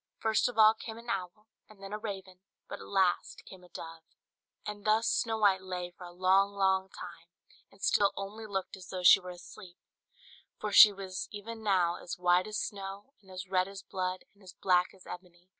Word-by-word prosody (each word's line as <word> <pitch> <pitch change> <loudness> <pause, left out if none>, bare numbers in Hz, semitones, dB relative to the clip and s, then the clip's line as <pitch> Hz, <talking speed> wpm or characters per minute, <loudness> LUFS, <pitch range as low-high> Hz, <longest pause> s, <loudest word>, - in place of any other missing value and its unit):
First 220 +2 +1
of 245 - -9
all 215 0 +8
came 225 0 -9
an 235 0 -6
owl, 195 +1 -5 0.2
and 215 -2 -17
then 195 +1 -7
a 210 - -3
raven, 195 -4 -7 0.3
but - - -7
at - - -11
last 190 -3 0
came 185 -2 -13
a 180 - -17
dove. 165 -1 -9 0.6
And 205 -1 -6
thus 215 +2 +2
Snow 225 -2 +1
White 200 -3 +3
lay 180 -1 -5
for 180 +1 -12
a 175 - -10
long, 190 +3 +3
long 190 -1 +1
time, 170 -3 -10 0.4
and 195 - -18
still 200 -1 +3
only 210 +3 -6
looked 195 -2 -4
as 185 -2 -13
though 185 -1 -5
she 180 - +9
were 180 -1 -9
asleep; 175 0 -12 0.8
for 210 - -3
she 205 +1 +10
was 190 -2 -6
even 220 +2 -8
now 185 -5 +2
as 175 - -7
white 180 +1 +3
as 215 - -4
snow, 200 +5 -6
and 190 - -21
as 185 0 -7
red 185 0 +1
as 195 -1 -9
blood, 185 -1 -4
and 205 - -27
as 185 -2 -12
black 180 -2 +2
as 190 - -18
ebony. 180 0 -11
190 Hz, 210 wpm, -31 LUFS, 180-210 Hz, 0.8 s, she